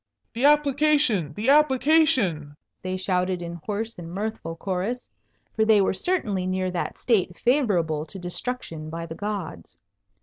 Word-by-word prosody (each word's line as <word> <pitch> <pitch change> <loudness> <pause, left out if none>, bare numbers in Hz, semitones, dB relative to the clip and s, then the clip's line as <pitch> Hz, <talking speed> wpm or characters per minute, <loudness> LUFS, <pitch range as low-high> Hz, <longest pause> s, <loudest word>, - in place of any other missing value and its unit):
"The 245 +3 0
application! 290 - +3
the 220 +5 -1
application!" 265 - +3 0.2
they 185 0 -3
shouted 180 -1 0
in 170 -1 -7
hoarse 220 0 -4
and 165 -1 -8
mirthful 195 -4 -4
chorus, 195 +8 -3 0.4
for 220 - +3
they 220 -1 +5
were 195 - +2
certainly 200 - -1
near 185 0 -1
that 175 - -3
state 190 -7 +1
favourable 180 - +1
to 195 - -8
destruction 175 -3 -4
by 165 +1 -5
the 165 - -7
gods. 185 - -6
195 Hz, 140 wpm, -25 LUFS, 175-245 Hz, 0.4 s, they